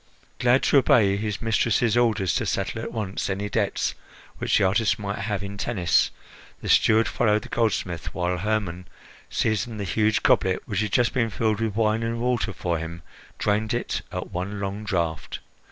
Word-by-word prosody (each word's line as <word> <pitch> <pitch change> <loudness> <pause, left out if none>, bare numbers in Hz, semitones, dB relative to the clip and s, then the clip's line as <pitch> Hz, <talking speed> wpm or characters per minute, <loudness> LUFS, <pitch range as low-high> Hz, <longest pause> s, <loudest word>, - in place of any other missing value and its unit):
Glad 125 +1 +3
to 140 - +5
obey 100 -6 +4
his 105 +1 -3
mistress's 115 0 +2
orders 110 -6 +2
to - - 0
settle - - -2
at - - -5
once 105 -5 -3
any 100 +2 -2
debts 100 -1 0 0.5
which - - +2
the 105 - +2
artist 100 +4 +2
might 100 -1 -4
have 100 0 -2
in 100 0 -6
Tennis, 90 -7 +2 0.5
the - - -6
steward 110 +1 +5
followed 105 -3 +1
the - - -10
goldsmith 95 -7 -1
while 90 0 -1
Hermon, 95 -3 -2 0.4
seizing 110 +1 -1
the 105 - -3
huge 105 +3 +1
goblet 95 -1 +3
which 100 -4 -1
had 105 -1 -1
just 120 +4 +2
been 120 -4 +1
filled 110 -1 0
with 110 -3 -1
wine 110 0 +2
and 115 0 -2
water 120 -3 0
for 85 -3 -2
him 80 +1 -7 0.3
drained 110 +2 0
it 120 - -2
at - - -5
one 100 +3 -4
long 100 +2 -4
draught. 85 -6 -2
105 Hz, 180 wpm, -25 LUFS, 95-115 Hz, 0.5 s, to